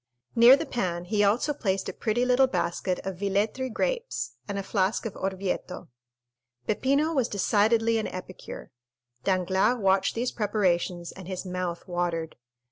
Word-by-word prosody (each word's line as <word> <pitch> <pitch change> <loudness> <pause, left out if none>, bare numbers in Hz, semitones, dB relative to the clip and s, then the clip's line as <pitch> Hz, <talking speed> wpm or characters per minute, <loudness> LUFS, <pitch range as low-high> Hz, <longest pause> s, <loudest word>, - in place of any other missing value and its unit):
Near 240 +3 +9
the - - -3
pan 175 -6 -2
he 205 +2 +1
also 225 +9 +2
placed 195 -8 -1
a - - -4
pretty 240 +2 0
little 255 +1 +4
basket 180 -5 -1
of 190 -2 -4
Villetri 205 +6 0
grapes 475 - -2 0.2
and 200 - -3
a 195 - -2
flask 195 +3 0
of 220 - -4
Orvieto. 190 -1 -3 0.8
Peppino 280 - +1
was 260 -6 +2
decidedly 225 +3 +2
an 220 - -2
epicure. 185 0 -8 0.5
Danglars 190 +5 +2
watched 195 -2 +2
these 240 +2 -1
preparations 180 -5 0
and 190 -2 -11
his 185 0 -5
mouth 180 -2 -4
watered. 175 -2 -2
200 Hz, 145 wpm, -27 LUFS, 185-230 Hz, 0.8 s, Near